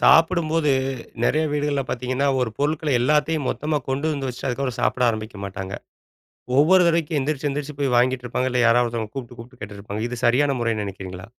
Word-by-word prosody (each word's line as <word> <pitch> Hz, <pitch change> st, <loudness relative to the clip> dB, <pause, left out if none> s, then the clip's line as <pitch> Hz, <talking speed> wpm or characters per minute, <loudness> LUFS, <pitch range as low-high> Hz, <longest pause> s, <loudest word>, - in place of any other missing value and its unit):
சாப்பிடும்போது 165 Hz, -2 st, +4 dB, 0.5 s
நெறைய 155 Hz, -, +2 dB
வீடுகள்ல 145 Hz, -1 st, 0 dB
பாத்தீங்கன்னா 130 Hz, +3 st, -1 dB
ஒரு 125 Hz, -3 st, 0 dB
பொருள்களை 150 Hz, +1 st, 0 dB
எல்லாத்தையும் 150 Hz, +2 st, +1 dB
மொத்தமா 150 Hz, 0 st, -1 dB
கொண்டு 135 Hz, +3 st, -1 dB
வந்து 135 Hz, -2 st, -3 dB
வச்சுட்டு 125 Hz, +2 st, -4 dB
அதுக்கப்புறம் 125 Hz, -1 st, -2 dB
சாப்ட 125 Hz, -, +1 dB
ஆரம்பிக்க 110 Hz, -2 st, -6 dB
மாட்டாங்க. 95 Hz, 0 st, -5 dB, 0.9 s
ஒவ்வொரு 180 Hz, +6 st, +6 dB
தடவைக்கும் 165 Hz, -2 st, +1 dB
எந்திரிச்சு 145 Hz, +1 st, -1 dB
எந்திரிச்சு 145 Hz, 0 st, -4 dB
போய் 135 Hz, -3 st, +1 dB
வாங்கிட்டு 125 Hz, +1 st, +2 dB
இருப்பாங்க. 130 Hz, +2 st, -1 dB
இல்ல 125 Hz, 0 st, +2 dB
யாராவது 120 Hz, +1 st, +4 dB
ஒருத்தவங்க 115 Hz, -2 st, -4 dB
கூப்பிட்டு 120 Hz, -3 st, -7 dB
கூப்பிட்டு 125 Hz, +2 st, -12 dB
கேட்டுட்டு 100 Hz, -1 st, -8 dB
இருப்பாங்க. 105 Hz, +2 st, -5 dB
இது 125 Hz, -, -4 dB
சரியான 135 Hz, +4 st, +3 dB
முறைனு 115 Hz, -3 st, 0 dB
நினைக்கிறீங்களா? 95 Hz, -1 st, -7 dB
130 Hz, 175 wpm, -23 LUFS, 115-150 Hz, 0.9 s, ஒவ்வொரு